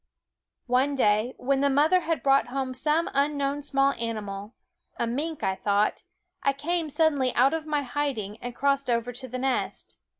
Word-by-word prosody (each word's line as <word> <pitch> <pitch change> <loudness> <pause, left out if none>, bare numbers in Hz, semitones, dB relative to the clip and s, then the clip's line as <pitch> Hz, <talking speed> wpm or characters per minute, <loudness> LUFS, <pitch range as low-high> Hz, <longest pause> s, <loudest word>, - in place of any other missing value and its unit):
One 260 +3 +2
day, 215 0 +2
when 270 +1 0
the 280 - +3
mother 300 +6 +4
had 330 -6 -2
brought 275 -1 +4
home 260 0 -3
some 305 +5 +2
unknown 280 0 0
small 275 -1 +2
animal 210 -2 -5 0.4
a - - 0
mink, 295 +7 -3
I 190 - +1
thought 200 +2 0 0.4
I 275 - +2
came 325 +3 -2
suddenly 285 -4 +2
out 265 +5 +4
of 320 -1 -3
my 295 -2 0
hiding 250 -7 -3
and 245 0 -7
crossed 275 -1 +1
over 235 0 0
to 260 +2 -6
the 255 +1 -5
nest. 260 0 -2
275 Hz, 170 wpm, -26 LUFS, 240-290 Hz, 0.4 s, mother